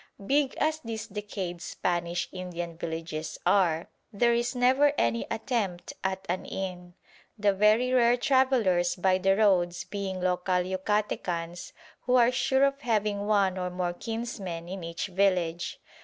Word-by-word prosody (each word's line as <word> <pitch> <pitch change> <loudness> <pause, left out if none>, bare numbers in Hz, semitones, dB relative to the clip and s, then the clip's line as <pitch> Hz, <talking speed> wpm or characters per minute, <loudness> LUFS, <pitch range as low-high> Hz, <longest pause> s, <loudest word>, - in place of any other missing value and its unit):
Big 280 +3 +2
as 310 +1 +1
these 225 -6 -5
decayed 195 -4 -5
Spanish 175 -1 -2
Indian 175 -2 -5
villages 160 -1 -5
are, 170 -5 +3 0.2
there 235 +3 +3
is 240 +2 0
never 260 +4 +4
any 115 0 +1
attempt 215 -7 -2
at 190 0 -2
an 180 +2 -2
inn, 180 -2 -6 0.4
the 205 -1 +3
very 215 +6 +3
rare 240 -1 +4
travellers 245 -10 +2
by 185 0 +2
the 195 +1 +3
roads 180 -5 +2
being 195 -2 -4
local 180 0 0
Yucatecans 185 -3 -2 0.4
who 250 - +4
are 245 -1 +5
sure 265 +1 +2
of 275 0 +1
having 210 -4 0
one 195 -3 +2
or 180 0 -2
more 180 -1 -2
kinsmen 200 -6 -5
in 185 0 -6
each 165 0 -4
village. 180 -3 0
190 Hz, 140 wpm, -28 LUFS, 175-230 Hz, 0.4 s, are